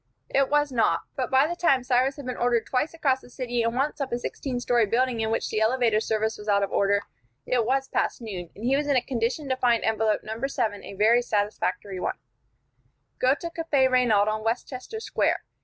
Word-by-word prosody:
It 275 -1 +2
was 295 -1 +2
not; 235 -3 +2
but 255 - -2
by 265 +2 +4
the 345 +3 -3
time 275 -7 +2
Cyrus 255 +2 +2
had 285 - -9
been 255 -1 -3
ordered 240 -1 +1
twice 280 +6 -1
across 265 -5 +1
the - - -16
city 245 -1 -2
and 230 +1 0
once 280 +3 -1
up 270 - -3
a 240 - 0
sixteen 250 +1 -4
story 240 -2 +2
building 245 +2 +1
in 220 - 0
which 225 - -1
the 215 - 0
elevator 230 -1 +3
service 220 0 -1
was 210 - -10
out 200 -1 +3
of 195 - -2
order, 200 0 +2 0.4
it 240 -3 +1
was 270 +1 +1
past - - -1
noon, 190 -7 -6
and 215 - -7
he 265 +2 +3
was 290 +1 0
in 285 - +2
a 255 - +4
condition 255 +4 -2
to 260 - +2
find 240 -3 +2
envelope 220 -1 +1
No. 225 +5 -3
7 215 -7 -2
a - - -9
very 225 +4 +4
satisfactory 205 -3 -2
one: - - -2 1.0
"Go 260 +2 +3
to 335 +2 -6
Cafe 310 -5 +2
Reynaud 240 -5 +3
on 215 0 -1
Westchester 255 - -3
Square. - - 0
245 Hz, 220 wpm, -26 LUFS, 220-265 Hz, 1.0 s, by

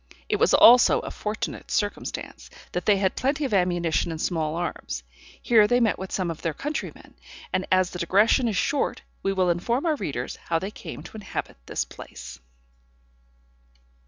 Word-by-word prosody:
It - - +2
was - - +4
also 245 +1 +7
a - - -6
fortunate 210 +1 -5
circumstance, 205 -2 -3 0.2
that 180 -1 -4
they 205 -2 +5
had 190 -1 0
plenty 280 +3 0
of 260 - -3
ammunition 175 -4 +1
and 160 -1 -5
small 160 -2 -1
arms. 170 - -4 0.4
Here 220 -3 +5
they 245 +3 +3
met 225 -4 +2
with 190 0 -6
some 180 -3 -1
of 160 - -8
their 165 -3 -2
countrymen; 295 - -5 0.4
and 185 - 0
as 185 -1 +3
the 180 - -6
digression 210 +8 +3
is 210 -5 -1
short, 285 +7 0 0.2
we 195 - 0
will 185 -2 +2
inform 235 - -1
our 320 -2 +2
readers 140 - -4
how 165 - -1
they 190 +5 -4
came - - -9
to - - -10
inhabit 210 - -5
this - - -1
place. - - -10
190 Hz, 175 wpm, -25 LUFS, 175-230 Hz, 0.4 s, also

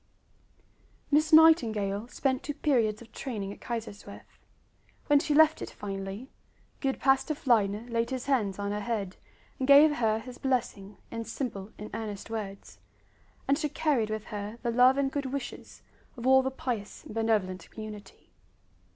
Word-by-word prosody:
Miss 305 +2 +3
Nightingale 230 - +5
spent 260 +1 -1
two 295 - -5
periods 235 -8 +1
of 230 - -19
training 205 -7 -5
at - - -16
Kaiserswerth. 230 -4 -7 0.7
When 290 -1 +5
she 295 0 0
left 315 +1 +5
it - - -5
finally, 195 +4 -6 0.5
good 270 -2 -1
Pastor 270 +3 +2
Fliedner 220 -4 +1
laid 230 -1 -1
his 260 -2 -4
hands 225 -9 0
on 200 0 -3
her 205 - -2
head 205 -4 -3 0.4
and 260 - -1
gave 295 +2 +7
her 220 -2 +2
his 245 +2 -9
blessing 225 -7 -2
in 230 0 -4
simple 220 -4 -5
and 210 - -8
earnest 215 -1 -6
words; 200 -3 -6 0.7
and 280 +2 +2
she 300 - -1
carried 285 -8 0
with 215 -1 -3
her 210 +1 -6
the 235 - 0
love 250 +3 +5
and 275 -1 +1
good 280 -1 -2
wishes 270 -1 -7 0.3
of 240 - -7
all 265 0 +6
the 265 - -1
pious 245 -6 -5
and - - -10
benevolent 210 -5 -1
community. 210 -2 -10
235 Hz, 160 wpm, -29 LUFS, 210-270 Hz, 0.7 s, gave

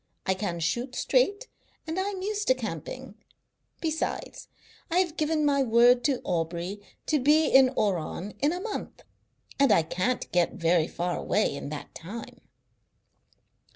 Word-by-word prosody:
I 190 - +2
can 185 -3 -3
shoot 240 +11 -2
straight - - +1 0.4
and 325 +3 -3
I 390 +2 0
am 380 -2 -5
used 415 +1 -2
to 260 - +5
camping. 235 - -6 0.7
Besides, 320 -1 -3 0.4
I 340 - 0
have 355 -4 +2
given 305 -1 +1
my 280 -1 +3
word 245 0 +5
to 270 -3 +1
Aubrey 175 +3 -2 0.2
to 305 - +2
be 300 +4 +4
in 265 -2 +6
Oran 190 0 -1
in 290 +2 +3
a 355 - -3
month, 425 +1 -6 0.6
and 275 -4 +5
I 180 -5 +5
can't 185 +10 -2
get 175 -1 +2
very 165 -1 +2
far 175 +1 -2
away 210 -8 0
in 140 - -6
that 150 -1 -7
time." 210 +8 -9
245 Hz, 155 wpm, -27 LUFS, -, 0.7 s, in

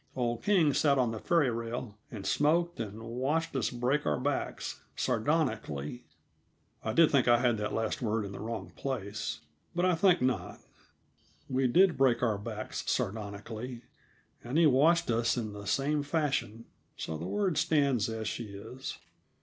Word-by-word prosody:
Old 120 -2 -1
King 175 -8 +3
sat 140 0 +3
on 125 -3 +2
the 110 - -4
ferry 160 -4 +2
rail 115 -1 -4
and 100 -4 -7
smoked, 170 +3 +2
and 110 0 -5
watched 135 +8 -1
us 135 - +1
break 125 +5 0
our - - 0
backs 140 +2 -2
sardonically 125 - -1 0.8
I 110 - -1
did 165 +5 +5
think 135 -4 +3
I 120 0 +6
had 120 -2 +2
that 105 - -2
last 110 +2 -1
word 110 -2 0
in 100 - -6
the 100 - -7
wrong 115 +1 -5
place; 110 -6 -4 0.3
but 175 +1 +2
I 185 - +4
think 180 +1 +4
not. 130 0 -1 0.9
We 130 0 +1
did 180 +8 +4
break 125 -3 +3
our 110 -4 +1
backs 100 - -5
sardonically, 110 +4 -3 0.6
and 125 +6 -2
he 170 - +6
watched 155 +2 +4
us 115 +2 +1
in 110 -3 -3
the 100 -1 -8
same 145 +2 +1
fashion; 140 -7 -1 0.3
so 80 - -4
the 80 +3 -5
word 190 - 0
stands 140 -8 +2
as 110 -1 -3
she 115 - -3
is. 105 +6 -7
125 Hz, 165 wpm, -30 LUFS, 110-145 Hz, 0.9 s, I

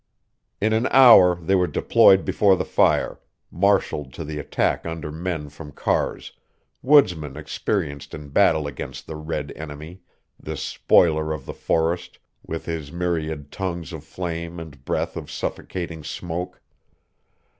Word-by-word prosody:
In 110 +2 +1
an 115 +3 +2
hour 115 -9 +8
they 85 +2 -2
were 90 -2 +3
deployed 95 +2 +4
before 100 -2 +4
the - - -2
fire, - - +2 0.3
marshalled 90 -7 +1
to 85 - -6
the 75 0 -5
attack 75 - 0
under 80 -2 -5
men 80 -1 -4
from 75 +1 -11
Carr's, - - -2 0.5
woodsmen 90 - +3
experienced 75 -2 -3
in 75 -1 -9
battle 80 -1 +3
against 70 -3 -7
the 80 - -7
red 75 -1 -4
enemy, 80 +4 -9 0.4
this - - -5
spoiler 80 -2 +3
of 75 -4 -7
the - - -6
forest 85 +2 -1 0.3
with 80 0 -6
his 80 -4 -5
myriad 80 -4 -3
tongues 85 -3 -4
of 80 -2 -7
flame 85 -1 -5
and 80 -4 -11
breath - - -2
of - - -7
suffocating 85 -4 -5
smoke. 85 +3 -5
80 Hz, 140 wpm, -23 LUFS, 75-90 Hz, 0.5 s, hour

